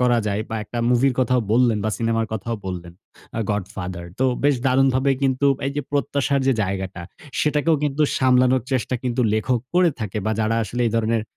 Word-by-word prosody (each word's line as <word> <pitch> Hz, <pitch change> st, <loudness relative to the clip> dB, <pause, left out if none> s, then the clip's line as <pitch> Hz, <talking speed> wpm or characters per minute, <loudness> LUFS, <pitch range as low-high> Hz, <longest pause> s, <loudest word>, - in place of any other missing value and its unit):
করা 120 Hz, -1 st, +3 dB
যায় 105 Hz, +1 st, -1 dB
বা 110 Hz, -, -2 dB
একটা 120 Hz, -, -6 dB
মুভির 125 Hz, +1 st, +3 dB
কথাও 125 Hz, 0 st, +2 dB
বললেন 120 Hz, -3 st, +3 dB
বা 110 Hz, -, +1 dB
সিনেমা 115 Hz, -1 st, +1 dB
কথাও 110 Hz, +2 st, -3 dB
বললেন, 90 Hz, -2 st, -6 dB, 0.5 s
আ -, -, 0 dB
'গডফাদার' 95 Hz, -4 st, -4 dB
তো 130 Hz, -, +4 dB, 0.2 s
বেশ 145 Hz, 0 st, +5 dB
দারুণভাবে 130 Hz, +1 st, +3 dB
কিন্তু 135 Hz, +1 st, +2 dB, 0.2 s
এই 140 Hz, -, -2 dB
যে, 145 Hz, -, 0 dB
প্রত্যাশার 140 Hz, -1 st, +1 dB
যে, 135 Hz, -, +4 dB
জায়গাটা 95 Hz, -2 st, -4 dB, 0.4 s
সেটাকেও 150 Hz, +1 st, +2 dB
কিন্তু 145 Hz, +1 st, 0 dB, 0.2 s
সামলানোর 130 Hz, -1 st, +4 dB
চেষ্টা 130 Hz, 0 st, 0 dB
কিন্তু 125 Hz, 0 st, -1 dB
লেখক 120 Hz, +3 st, 0 dB
করে 180 Hz, -2 st, +5 dB
থাকে 105 Hz, 0 st, -3 dB
বা 110 Hz, -, +1 dB
যারা 110 Hz, +1 st, +1 dB
আসলে 120 Hz, +4 st, -4 dB
এই -, -, +1 dB
ধরনের 115 Hz, 0 st, +1 dB
120 Hz, 185 wpm, -22 LUFS, 110-130 Hz, 0.5 s, বেশ